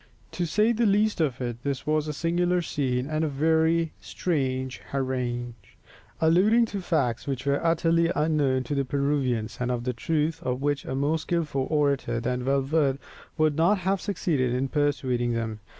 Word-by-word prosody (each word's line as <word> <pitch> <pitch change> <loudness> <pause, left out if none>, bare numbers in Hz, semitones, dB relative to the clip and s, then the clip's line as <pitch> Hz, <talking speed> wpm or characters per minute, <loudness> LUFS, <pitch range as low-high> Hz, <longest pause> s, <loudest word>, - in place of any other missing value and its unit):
To 175 -2 -2
say 210 +7 +3
the 235 -1 +2
least 205 -1 +2
of 135 -5 0
it, 120 -1 -4
this 140 -1 -3
was 155 0 +1
a - - -1
singular 175 +3 +1
scene 130 -4 -1
and 155 +1 -1
a - - +1
very 160 +3 +2
strange 130 -6 -2
harangue, 125 -3 -2 0.7
alluding 190 +9 +4
to 200 - -2
facts 130 -10 -1
which 135 -1 -3
were 140 0 +1
utterly 165 0 +2
unknown 145 -4 +1
to 130 - -4
the 140 -1 +1
Peruvians, 135 -4 -1
and 125 0 -1
of 120 -1 -1
the 125 0 -1
truth 155 +5 -1
of 125 0 -2
which 145 0 -1
a 130 - -3
more 145 +4 +1
skilful 155 -6 -1
orator 140 -6 +1
than 125 +1 -2
Valverde 135 +1 +1 0.4
would 155 -2 +2
not 170 +7 +3
have 190 +1 -1
succeeded 140 -11 0
in 130 +1 -1
persuading 130 -5 0
them. 115 -2 -3
145 Hz, 170 wpm, -26 LUFS, 130-165 Hz, 0.7 s, alluding